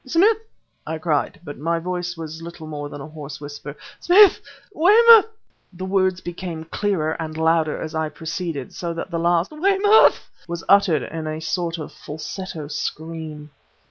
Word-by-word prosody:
"Smith!" 375 - +3 0.5
I 160 +1 -3
cried, 155 -2 -1
but 145 -3 -9
my 165 +3 0
voice 175 0 -4
was 160 0 -7
little 170 -1 -9
more 145 -2 -6
than 145 - -8
a 140 - -8
hoarse 150 -2 -9
whisper 145 0 -8 0.2
"Smith! 390 +3 +6 0.3
Weymouth!" 440 +5 +7 0.4
The 185 0 -7
words 185 -1 +1
became 175 -2 -6
clearer 165 -2 -1
and 160 -1 -5
louder 160 -1 +1
as 160 0 -6
I 160 -1 -1
proceeded, 160 -4 -5
so 170 -1 -4
that 170 - -6
the 170 - -1
last 170 +1 +1
"Weymouth!" 395 +6 +4 0.2
was 170 -1 -5
uttered 185 -8 +4
in 160 -1 -5
a 155 0 -3
sort 165 +1 -2
of 155 - -7
falsetto 155 +1 -7
scream. 155 -1 -5
165 Hz, 160 wpm, -22 LUFS, 155-185 Hz, 0.5 s, Weymouth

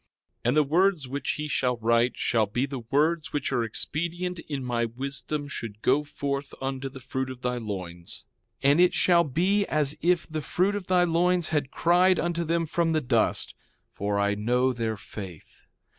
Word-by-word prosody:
3:19 - - -49
And 125 +5 +2
the 150 - +6
words 170 0 +2
which 135 +1 -2
he 150 0 -4
shall 125 -4 0
write 115 +2 +2
shall 110 -3 +1
be 120 +6 0
the 135 -1 -5
words 150 +7 +1
which 145 -2 -1
are 125 -3 +1
expedient 170 +9 -1
in 140 -3 -3
my 120 -1 0
wisdom 140 +5 -4
should 110 -6 -7
go 140 +4 +3
forth 140 -1 -4
unto 135 0 -3
the 135 - -11
fruit 130 +1 -3
of 130 -1 -9
thy 125 0 0
loins. 90 -6 -6 0.4
And 140 +4 +5
it 180 0 +5
shall 170 -2 +4
be 180 +8 +1
as 150 -1 +1
if 175 0 +2
the 155 -1 -4
fruit 180 +8 +1
of 205 -3 -4
thy 180 -1 +4
loins 175 0 +2
had 145 -4 0
cried 180 +4 +3
unto 170 0 -1
them 165 +1 0
from 165 +1 0
the 155 - +1
dust; 125 - +1 0.4
for 100 0 -2
I 100 0 +2
know 125 +5 +1
their 115 -2 -2
faith. 95 -5 -10
140 Hz, 190 wpm, -27 LUFS, 120-170 Hz, 0.4 s, the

